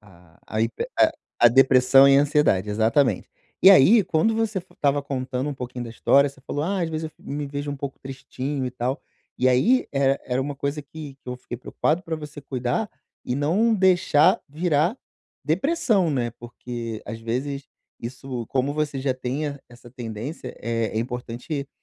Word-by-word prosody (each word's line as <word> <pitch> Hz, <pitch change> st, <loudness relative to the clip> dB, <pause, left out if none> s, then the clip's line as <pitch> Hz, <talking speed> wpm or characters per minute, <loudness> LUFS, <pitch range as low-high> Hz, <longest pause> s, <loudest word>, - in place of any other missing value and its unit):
a 90 Hz, -5 st, -21 dB
a 110 Hz, -, -2 dB
hiper 120 Hz, -, -2 dB
a -, -, +5 dB, 0.3 s
a 120 Hz, -, +8 dB
depressão 135 Hz, +2 st, +6 dB
e 135 Hz, -, +6 dB
a -, -, +5 dB
ansiedade, 145 Hz, -10 st, +2 dB
exatamente. 115 Hz, +6 st, +2 dB, 0.3 s
E, 190 Hz, -, +10 dB
aí, 195 Hz, -, +7 dB
quando 170 Hz, +7 st, +1 dB
você 220 Hz, -3 st, 0 dB
f 180 Hz, -, -10 dB
estava 145 Hz, 0 st, +1 dB
contando 130 Hz, 0 st, -3 dB
um 145 Hz, -, -5 dB
pouquinho 125 Hz, -1 st, -6 dB
da 115 Hz, -, -7 dB
história, 140 Hz, +4 st, +3 dB
você 135 Hz, -1 st, -16 dB
falou: 145 Hz, +2 st, -4 dB
"Ah, 190 Hz, +1 st, -1 dB
às 165 Hz, -, -1 dB
vezes 160 Hz, 0 st, -4 dB
eu 155 Hz, -, -5 dB
fic -, -, -26 dB
me 145 Hz, +1 st, -3 dB
vejo 145 Hz, +1 st, -4 dB
um 140 Hz, -, -4 dB
pouco 135 Hz, 0 st, -6 dB
tristinho 135 Hz, +1 st, -5 dB
e 125 Hz, -, -2 dB
tal", 125 Hz, +3 st, -3 dB, 0.4 s
e 130 Hz, -, +2 dB
aí, 225 Hz, -, +3 dB
er 135 Hz, 0 st, +2 dB
era 125 Hz, +1 st, -1 dB
uma 140 Hz, +1 st, -4 dB
coisa 140 Hz, +2 st, -2 dB
que 145 Hz, -1 st, -10 dB
que -, -, -12 dB
eu 125 Hz, -, -4 dB
fiquei 120 Hz, -1 st, -8 dB
preocupado 160 Hz, +6 st, -1 dB
pra 165 Hz, -3 st, -3 dB
você 150 Hz, -1 st, -9 dB
cuidar 130 Hz, -, -2 dB, 0.4 s
e 125 Hz, -, -1 dB
não 195 Hz, +11 st, +2 dB
deixar 180 Hz, -6 st, +4 dB
virar 160 Hz, -, +1 dB, 0.5 s
depressão, 195 Hz, -, +1 dB
né? 120 Hz, -4 st, -1 dB
Porque, 120 Hz, -1 st, -7 dB
às 115 Hz, -1 st, -6 dB
vezes, 135 Hz, +5 st, -3 dB, 0.3 s
isso, 125 Hz, -1 st, -6 dB
como 135 Hz, +2 st, 0 dB
você 150 Hz, -2 st, -2 dB
já 130 Hz, -1 st, +1 dB
tem 130 Hz, +4 st, -3 dB
e 140 Hz, -1 st, -5 dB
essa 120 Hz, 0 st, -15 dB
tendência, 120 Hz, +4 st, -7 dB
é 115 Hz, 0 st, -1 dB
é -, -, +2 dB
importante 125 Hz, +4 st, -4 dB
140 Hz, 190 wpm, -24 LUFS, 125-150 Hz, 0.5 s, E